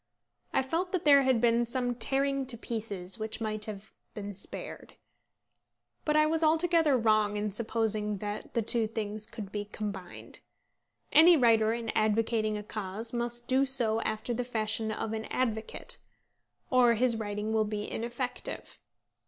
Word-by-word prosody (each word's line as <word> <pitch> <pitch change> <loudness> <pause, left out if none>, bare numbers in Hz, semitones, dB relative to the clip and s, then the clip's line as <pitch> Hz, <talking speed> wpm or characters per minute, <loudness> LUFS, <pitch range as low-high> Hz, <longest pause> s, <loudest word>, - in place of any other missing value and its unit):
I - - +1
felt 335 +7 -2
that 370 - -1
there 280 -1 +7
had 260 -3 +2
been 235 0 +3
some 245 +1 -1
tearing 270 +3 0
to 245 -2 -1
pieces 210 -4 -2
which 220 +2 -3
might 215 -1 -3
have 215 -1 -9 0.2
been 205 -1 -6
spared. 195 - -7 1.1
But 300 - +1
I 305 - +5
was 320 +1 0
altogether 320 -2 +3
wrong 215 -2 +2
in 210 0 -2
supposing 215 -1 0
that 205 +1 -6
the 230 - +1
two 225 0 +2
things 215 -1 -4
could 215 -4 -8
be 205 -1 -3
combined. 205 -3 -7 0.7
Any 330 +3 +7
writer 225 -4 +4
in 230 -1 -3
advocating 215 0 +1
a 210 - -6
cause 215 +2 -6
must 240 0 -2
do 265 +1 +3
so 240 -5 +5
after 220 +3 -2
the 250 +2 -2
fashion 220 -2 -1
of 215 0 -4
an 220 0 -4
advocate, 235 - -3 0.7
or 245 -2 +5
his 240 0 +3
writing 210 0 -3
will 220 -1 +3
be 210 0 -3
ineffective. 240 +2 -5
225 Hz, 155 wpm, -29 LUFS, 215-250 Hz, 1.1 s, there